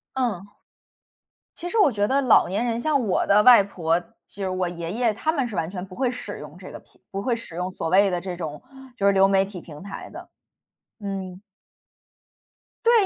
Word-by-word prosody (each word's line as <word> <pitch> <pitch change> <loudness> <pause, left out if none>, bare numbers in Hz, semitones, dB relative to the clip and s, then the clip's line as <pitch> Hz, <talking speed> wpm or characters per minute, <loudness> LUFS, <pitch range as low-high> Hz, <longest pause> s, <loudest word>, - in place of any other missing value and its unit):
嗯， 230 -8 -1 1.1
其 350 - -7
实 450 - -1
我 405 -9 +6
觉 205 -3 0
得 270 +5 +2
老 255 -4 +5
年 200 +6 -1
人， 235 -1 -1
像 280 -3 +1
我 190 - +1
的 205 +1 +5
外 245 -2 +8
婆， 170 -4 0
就 175 - -20 0.4
是 - - -1
我 185 -1 -1
爷 170 -1 -5
爷， 230 0 +1
他 315 +9 0
们 270 -6 -1
是 215 - -7
完 165 0 -1
全 185 -2 -5
不 185 - -12
会 255 +4 0
使 250 - -6
用 - - -11
这 - - -10
个 - - -8
平 - - -28
不 195 - -4
会 240 +2 +1
使 230 -7 -8
用 180 +2 -3
所 165 - -3
谓 195 +3 +4
的 180 -1 -1
这 180 -1 -5
种 155 -4 -6 0.3
就 200 - 0
是 200 - +6
流 195 0 +5
媒 195 0 +3
体 195 -2 -8
平 150 -3 -11
台 200 0 -8
的， - - -10 0.7
嗯。 190 -2 -5 1.4
对， 465 - +5
195 Hz, 230 characters per minute, -24 LUFS, 180-240 Hz, 1.4 s, 外